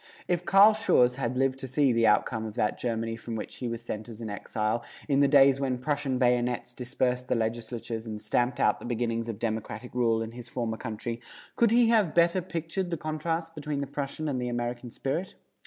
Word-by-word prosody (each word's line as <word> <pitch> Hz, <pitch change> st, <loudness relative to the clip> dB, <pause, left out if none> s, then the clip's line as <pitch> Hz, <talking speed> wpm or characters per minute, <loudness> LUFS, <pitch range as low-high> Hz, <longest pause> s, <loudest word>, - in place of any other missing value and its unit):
If 175 Hz, 0 st, 0 dB
Carl 200 Hz, +4 st, +7 dB
Schurz 125 Hz, -, +3 dB
had 125 Hz, -1 st, -2 dB
lived 135 Hz, 0 st, +1 dB
to 130 Hz, -, -5 dB
see 135 Hz, 0 st, +2 dB
the 115 Hz, -1 st, +3 dB
outcome 110 Hz, +1 st, +2 dB
of 110 Hz, -, -8 dB
that 105 Hz, -3 st, 0 dB
Germany 115 Hz, -1 st, -2 dB
from 115 Hz, 0 st, -6 dB
which 110 Hz, -, -6 dB
he 125 Hz, -, -3 dB
was 115 Hz, 0 st, -4 dB
sent 110 Hz, -1 st, -5 dB
as 115 Hz, -1 st, -9 dB
an 110 Hz, -3 st, -5 dB
exile, 110 Hz, +3 st, -2 dB, 0.2 s
in 140 Hz, -2 st, +2 dB
the 140 Hz, -, +5 dB
days 135 Hz, -1 st, +6 dB
when 130 Hz, -2 st, 0 dB
Prussian 140 Hz, 0 st, -1 dB
bayonets 125 Hz, -1 st, +1 dB
dispersed 125 Hz, 0 st, -1 dB
the -, -, +1 dB
legislatures 115 Hz, 0 st, -3 dB
and 105 Hz, -1 st, -5 dB
stamped 120 Hz, +3 st, 0 dB
out -, -, +3 dB
the -, -, -9 dB
beginnings 115 Hz, -1 st, -1 dB
of 110 Hz, -, -4 dB
democratic 110 Hz, +1 st, -4 dB
rule 115 Hz, -2 st, +2 dB
in 110 Hz, -, -6 dB
his 120 Hz, 0 st, -9 dB
former 115 Hz, -3 st, -2 dB
country, 115 Hz, 0 st, -5 dB, 0.3 s
could 235 Hz, -, +4 dB
he 235 Hz, +1 st, +5 dB
have 215 Hz, -8 st, +3 dB
better 170 Hz, +2 st, +4 dB
pictured 170 Hz, +1 st, -3 dB
the 170 Hz, -, -2 dB
contrasts 165 Hz, +2 st, -2 dB
between 150 Hz, -2 st, -4 dB
the 140 Hz, -, -1 dB
Prussian 140 Hz, +2 st, -4 dB
and 130 Hz, -4 st, -1 dB
the 125 Hz, -, -2 dB
American 120 Hz, 0 st, -3 dB
spirit? 140 Hz, +10 st, -3 dB
125 Hz, 210 wpm, -28 LUFS, 115-145 Hz, 0.3 s, Carl